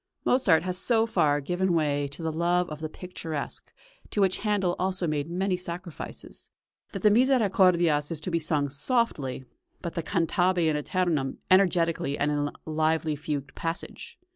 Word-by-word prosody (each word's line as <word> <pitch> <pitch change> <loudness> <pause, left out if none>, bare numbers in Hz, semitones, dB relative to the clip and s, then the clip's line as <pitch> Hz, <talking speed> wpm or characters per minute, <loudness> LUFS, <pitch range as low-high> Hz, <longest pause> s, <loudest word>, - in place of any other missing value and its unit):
Mozart 190 -11 +4
has 180 0 -1
so 225 0 +3
far 145 -9 +2
given 180 +4 0
way 145 -3 +1
to 140 +4 -8
the 160 - -1
love 175 +2 +1
of 150 - -6
the 155 0 -4
picturesque, 165 -4 -6 0.4
to - - -3
which 190 -2 +2
Handel 205 -4 0
also 185 -1 0
made 150 -1 -2
many 185 +2 0
sacrifices, 175 -1 -7 0.4
that - - -6
the 210 - +6
"Misericordias" 185 - +3
is 165 - -2
to 180 - -4
be 170 - +1
sung 150 -3 0
softly, 145 - 0 0.4
but 170 - -5
the 170 - -2
"cantabe 175 +2 +1
in 155 -1 +2
æternum" 150 -3 -1
energetically 170 -6 +3
and 145 +1 +1
in 145 - 0
a - - -7
lively 155 0 0
fugued 145 -2 -4
passage. 165 0 -5
170 Hz, 165 wpm, -27 LUFS, 150-185 Hz, 0.4 s, the